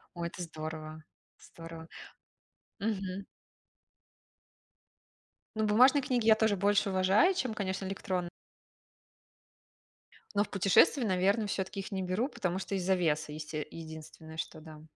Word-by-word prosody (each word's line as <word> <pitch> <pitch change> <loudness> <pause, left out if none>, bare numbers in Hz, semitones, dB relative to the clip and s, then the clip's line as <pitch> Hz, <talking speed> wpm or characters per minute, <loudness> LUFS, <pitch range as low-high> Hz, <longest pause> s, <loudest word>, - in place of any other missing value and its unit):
Ой, 170 0 -2
это 175 - -8
здорово 155 -1 -7 0.4
здорово. 165 0 -10 0.9
Мгм. 200 -2 -3 2.3
Ну, 220 0 +1
бумажные 255 +7 +6
книги 245 -3 0
я 220 - +8
тоже 220 -2 +2
больше 200 +1 +2
уважаю, 190 - +4
чем, 255 -11 -1
конечно, 190 -2 -3
электрон 185 -2 -2 2.1
Но 205 - +4
в - - -10
путешествии, 195 +7 +4
наверно, 200 +2 +2
всё-таки 195 0 -3
их 195 - -6
не 190 -1 -2
беру, 185 +7 0
потому 185 - -2
что 195 - -3
из-за 190 0 +2
веса, 155 -3 0
есте 150 0 -5
единственное, 160 0 -10
что 155 - -5
да. 155 -1 -11
190 Hz, 125 wpm, -31 LUFS, 165-205 Hz, 2.3 s, я